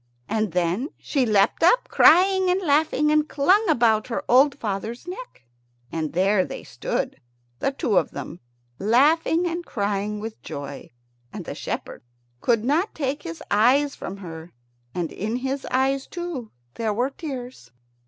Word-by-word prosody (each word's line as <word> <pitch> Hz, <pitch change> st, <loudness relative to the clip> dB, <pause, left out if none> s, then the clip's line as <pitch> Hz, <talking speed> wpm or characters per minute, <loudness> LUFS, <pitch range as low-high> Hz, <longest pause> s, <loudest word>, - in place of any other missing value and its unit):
And 215 Hz, -3 st, -1 dB
then 180 Hz, -, 0 dB
she 270 Hz, -5 st, 0 dB
leapt 205 Hz, -1 st, +3 dB
up, -, -, +4 dB
crying 375 Hz, 0 st, +5 dB
and 365 Hz, +1 st, +2 dB
laughing, 300 Hz, -2 st, +2 dB
and 305 Hz, 0 st, +2 dB
clung 370 Hz, +10 st, +3 dB
about 230 Hz, -7 st, +3 dB
her 235 Hz, -, -3 dB
old 275 Hz, +3 st, +5 dB
father's 225 Hz, -, -4 dB
neck. 380 Hz, -, -8 dB, 0.5 s
And 160 Hz, -2 st, -3 dB
there 190 Hz, +2 st, +3 dB
they -, -, -7 dB
stood, -, -, -3 dB, 0.4 s
the 275 Hz, -, 0 dB
two 230 Hz, -7 st, 0 dB
of -, -, -3 dB
them, -, -, -7 dB, 0.4 s
laughing 305 Hz, -, +3 dB
and 345 Hz, 0 st, -2 dB
crying 205 Hz, -3 st, -2 dB
with 220 Hz, +1 st, -7 dB
joy. 140 Hz, -1 st, -7 dB, 0.4 s
And -, -, -7 dB
the -, -, -5 dB
shepherd -, -, -5 dB, 0.4 s
could 230 Hz, -, +1 dB
not 325 Hz, -, +1 dB
take 285 Hz, -1 st, -2 dB
his 335 Hz, -2 st, -7 dB
eyes 260 Hz, +7 st, +4 dB
from 195 Hz, -, -7 dB
her, 165 Hz, -3 st, -9 dB, 0.4 s
and 175 Hz, -3 st, -2 dB
in 215 Hz, +4 st, -3 dB
his 265 Hz, +2 st, -3 dB
eyes, 270 Hz, +1 st, +1 dB
too, 340 Hz, -10 st, -5 dB, 0.2 s
there 220 Hz, -, -2 dB
were 250 Hz, +5 st, 0 dB
tears. 255 Hz, -, -7 dB
255 Hz, 155 wpm, -24 LUFS, 210-310 Hz, 0.5 s, crying